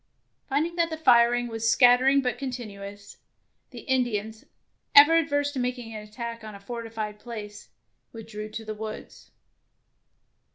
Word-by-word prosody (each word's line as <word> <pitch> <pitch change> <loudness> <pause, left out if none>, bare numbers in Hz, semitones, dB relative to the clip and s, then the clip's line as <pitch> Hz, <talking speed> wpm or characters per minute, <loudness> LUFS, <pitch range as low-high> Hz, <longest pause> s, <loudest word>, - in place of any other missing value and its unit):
Finding 315 +5 -1
that 335 -1 +2
the 320 - -5
firing 240 -4 +4
was 225 -1 -1
scatter 245 +2 +5
ing 275 +1 +5
but 250 -2 -2
continuous, 205 -6 -7 0.5
the - - -10
Indians, 220 -5 -2 0.5
ever 295 +3 +9
averse 285 -2 0
to 275 - -5
making 245 -2 -3
an 215 - -6
attack 230 +2 -7
on 215 -1 -9
a - - -11
for 235 +4 -6
tified 215 -2 -6
place, 210 -3 -9 0.4
withdrew 215 -1 -8
to 225 +1 -7
the 215 - -4
woods. 215 0 -9
235 Hz, 150 wpm, -26 LUFS, 215-260 Hz, 0.5 s, ever